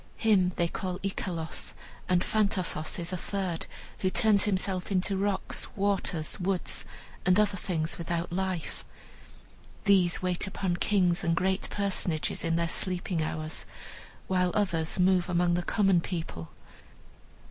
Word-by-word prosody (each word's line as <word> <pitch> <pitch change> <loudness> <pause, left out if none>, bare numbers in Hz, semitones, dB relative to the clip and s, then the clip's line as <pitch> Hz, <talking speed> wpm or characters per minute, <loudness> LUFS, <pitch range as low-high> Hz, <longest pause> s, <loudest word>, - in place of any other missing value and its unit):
Him 195 -5 +3
they 170 - +2
call 180 +1 -4
Icelos; 175 -4 -3 0.3
and 180 -1 +3
Phantasos 190 -7 +1
is 170 +1 -3
a - - -1
third, 185 -2 -3 0.3
who 185 - +1
turns 210 0 +4
himself 190 -1 0
into 195 +1 +1
rocks, 195 0 0
waters, 195 -5 0
woods, 185 0 -1 0.4
and 185 +2 +4
other 205 -1 +3
things 170 -4 -2
without 170 0 -2
life. 185 -2 -3 1.0
These 190 -4 +4
wait 180 +1 -1
upon 190 -2 -2
kings 180 -3 +2
and 165 -1 +2
great 190 +3 0
personages 185 -5 -1
in 165 0 +1
their 170 0 +1
sleeping 180 0 -1
hours, 155 0 -3 0.6
while 180 -1 +2
others 175 -6 +1
move 185 0 +3
among 175 0 +2
the 175 - +1
common 195 -1 +3
people. 165 - -5
180 Hz, 135 wpm, -29 LUFS, 170-195 Hz, 1.0 s, turns